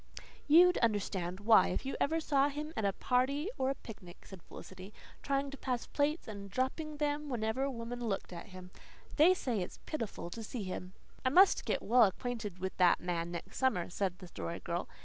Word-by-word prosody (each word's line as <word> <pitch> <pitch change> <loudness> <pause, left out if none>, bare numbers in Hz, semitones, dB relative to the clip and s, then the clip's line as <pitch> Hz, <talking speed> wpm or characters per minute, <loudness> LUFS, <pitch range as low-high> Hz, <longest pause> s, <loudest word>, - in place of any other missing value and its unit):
"You'd 355 +4 +7
understand 195 -5 -1
why 220 +1 +6
if - - -3
you 270 - -3
ever 320 +3 +1
saw 285 -3 +2
him 300 +2 -5
at 220 - -1
a 200 - +3
party 275 - 0
or 260 0 +1
a 275 - -1
picnic," 190 -8 -12
said 190 -3 -11
Felicity, 190 +4 -11 0.3
"trying 275 0 -1
to 280 - -8
pass 250 -3 -2
plates 300 +3 -1
and 200 -2 -7
dropping 280 +7 -2
them 295 0 -1
whenever 220 0 -1
a 275 - +1
woman 240 -1 -5
looked 195 -3 -3
at 170 +5 -8
him. 185 -2 -11 0.5
They 340 +5 +7
say 240 - -1
it's 180 - -6
pitiful 225 - -4
to 230 - -6
see 220 0 -5
him." 185 0 -6 0.3
"I 260 - +3
must 375 +8 +5
get - - -1
well 240 +1 +6
acquainted 210 -1 -3
with 190 +1 -4
that 180 -1 +5
man 170 -1 -2
next 170 -1 -7
summer," 185 -10 +1
said 185 -1 -1
the 185 - -11
Story 170 0 -5
Girl. 175 0 -3
230 Hz, 200 wpm, -33 LUFS, 185-280 Hz, 0.5 s, You'd